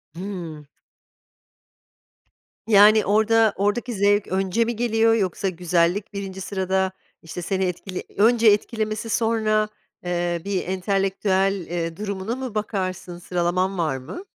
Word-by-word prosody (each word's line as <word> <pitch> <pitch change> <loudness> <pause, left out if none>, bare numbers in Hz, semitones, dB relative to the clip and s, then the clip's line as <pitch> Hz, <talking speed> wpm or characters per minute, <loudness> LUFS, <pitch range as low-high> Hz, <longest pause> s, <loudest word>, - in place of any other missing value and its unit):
Hımm. 170 -5 -7 2.0
Yani, 210 0 +6
orada 220 +1 +3
oradaki 220 +5 -1
zevk 205 0 +2
önce 190 +4 0
mi 235 +1 -2
geliyor? 225 -1 +2
Yoksa 195 -2 0
güzellik 180 +3 0
1. 195 -1 -6
sırada, 190 0 -1 0.3
işte, 165 +2 -7
seni 190 +2 -1
etkili 180 +1 -4
önce 230 +2 +4
etkilemesi 215 +1 +1
sonra, 220 -1 +1 0.4
eee, 175 -1 -1
bir 195 -3 -2
entelektüel, 195 0 0
eee, 165 -1 -3
durumuna 200 +2 -3
mı 260 -4 -6
bakarsın? 185 -4 -3
Sıralaman 180 +2 -1
var 155 -6 0
mı? 130 - -8
195 Hz, 115 wpm, -23 LUFS, 180-215 Hz, 2.0 s, Yani